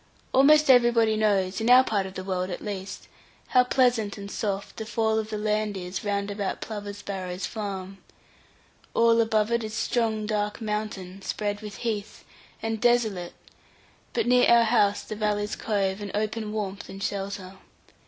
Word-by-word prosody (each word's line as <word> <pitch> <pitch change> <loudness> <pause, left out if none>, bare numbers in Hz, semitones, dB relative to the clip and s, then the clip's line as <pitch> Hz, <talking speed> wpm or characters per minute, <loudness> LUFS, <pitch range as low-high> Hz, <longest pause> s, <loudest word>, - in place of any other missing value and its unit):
Almost 300 +3 +6
everybody 240 -4 +5
knows, 200 -2 +1
in 225 - +1
our 255 +1 +8
part 200 -6 -1
of 190 - -11
the 185 - -5
world 185 -1 -2
at 180 - -6
least, 200 -2 -6 0.4
how 250 - +5
pleasant 245 -5 +1
and 200 0 -8
soft 200 -1 -3
the 220 - -4
fall 220 -1 +1
of 215 0 -4
the 215 - -3
land 210 -1 -1
is 180 0 -5
round 200 -1 -1
about 200 -1 -3
Plover's 205 -2 -6
Barrows 185 -2 -4
farm. 195 -3 -5 1.0
All 230 0 +5
above 220 -1 +1
it 235 -1 +1
is 215 0 -5
strong 225 -2 0
dark 210 0 -1
mountain, 210 -4 -4
spread 205 +1 -3
with 210 -2 -8
heath, 215 -2 -3 0.4
and 225 -1 -2
desolate, 220 -8 +1 0.8
but - - 0
near 250 0 +5
our 235 0 +7
house 210 -3 +2
the 215 - -6
valleys 210 0 -1
cove, 200 -2 -1
and 205 - -5
open 215 0 -2
warmth 200 -2 -4
and 195 +1 -7
shelter. 195 -1 -4
210 Hz, 165 wpm, -26 LUFS, 200-225 Hz, 1.0 s, our